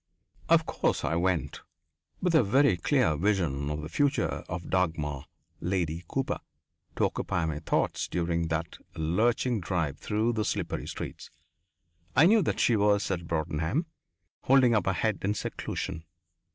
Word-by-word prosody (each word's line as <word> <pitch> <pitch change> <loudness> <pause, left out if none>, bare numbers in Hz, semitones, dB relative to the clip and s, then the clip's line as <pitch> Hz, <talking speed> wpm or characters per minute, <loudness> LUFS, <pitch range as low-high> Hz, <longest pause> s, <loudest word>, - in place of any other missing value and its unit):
Of - - +5
course - - 0
I - - 0
went, 90 0 0 0.6
with 180 -2 +2
a 160 - +6
very 120 +1 +4
clear 80 -2 +2
vision 80 -6 0
of 75 0 -3
the - - -4
future 145 - 0
of 85 -1 -5
Dagmar, 80 -7 0 0.3
Lady 85 -2 -1
Cooper, 135 -1 -2 0.6
to - - +2
occupy 85 -2 -1
my 80 -2 -2
thoughts 80 - 0
during 85 -1 -1
that 80 0 -3 0.2
lurching 110 +9 +1
drive 85 -5 -2
through 110 +3 0
the 110 -2 0
slippery - - -2
streets. - - -7 0.9
I 145 - +7
knew 215 +4 +6
that 165 - -1
she 120 - +4
was 100 -1 +2
at 85 -3 -3
Broadenham, 80 - -1 0.6
holding 130 -2 +5
up 110 - +1
her 95 - +3
head 100 +4 0
in 105 +2 0
seclusion. 80 - -4
90 Hz, 150 wpm, -28 LUFS, 80-110 Hz, 0.9 s, I